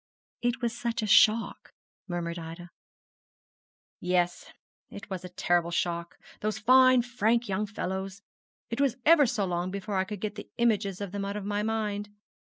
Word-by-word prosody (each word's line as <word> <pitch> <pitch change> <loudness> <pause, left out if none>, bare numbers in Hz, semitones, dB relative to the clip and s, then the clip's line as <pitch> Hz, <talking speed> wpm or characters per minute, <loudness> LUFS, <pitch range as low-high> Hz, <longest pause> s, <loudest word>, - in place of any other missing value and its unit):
'It 245 +1 -1
was 230 -1 0
such 235 -1 -2
a - - 0
shock,' 215 +2 +3 0.3
murmured 170 -1 -3
Ida. 165 +1 -9 1.3
'Yes, 175 -1 0 0.4
it 200 0 -11
was 185 -1 -4
a 180 - -7
terrible 175 -1 +1
shock. 170 0 -2 0.2
Those 215 0 -2
fine 255 +2 +6
frank 240 -1 +1
young 200 +2 -1
fellows! 195 -1 -5 0.5
It 235 +4 -1
was 270 -3 +1
ever 305 -3 +6
so 220 -4 0
long 175 0 -2
before 200 +1 -3
I 190 - +1
could 205 0 -6
get 215 +1 -3
the - - -9
images 205 -5 +1
of 200 -3 -4
them 200 0 -3
out 200 +1 -3
of 205 - -6
my 205 0 -1
mind. 210 -2 -2
205 Hz, 165 wpm, -28 LUFS, 180-230 Hz, 1.3 s, fine